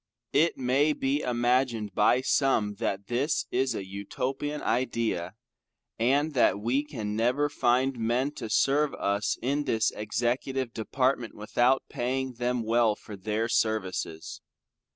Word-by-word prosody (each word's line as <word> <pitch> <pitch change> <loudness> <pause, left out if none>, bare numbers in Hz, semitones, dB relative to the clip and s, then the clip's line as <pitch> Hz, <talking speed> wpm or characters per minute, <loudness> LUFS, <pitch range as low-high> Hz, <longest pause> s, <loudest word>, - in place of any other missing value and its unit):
It 165 +2 +3
may 135 +4 +2
be 135 0 0
imagined 120 -3 0
by 120 +4 +3
some 130 -6 +2
that 100 0 -2
this 130 +7 0
is 130 +1 +1
an 95 - -4
Utopian 130 +9 -4
Idea, 115 -7 -1 0.6
and 140 +6 +2
that 120 -5 +3
we 120 +7 0
can 110 -9 -5
never 125 +6 +1
find 130 -2 +1
men 120 +5 0
to 115 -6 -7
serve 140 +5 +2
us 100 +2 0
in 140 +3 0
the 115 - 0 0.2
Executive 120 +4 -2
department, 125 +1 -1
without 120 +5 +2
paying 130 +1 -2
them 125 0 -1
well 115 -1 +3
for 105 - -10
their 110 +3 -2
services. 95 -8 -2
120 Hz, 130 wpm, -28 LUFS, 110-135 Hz, 0.6 s, It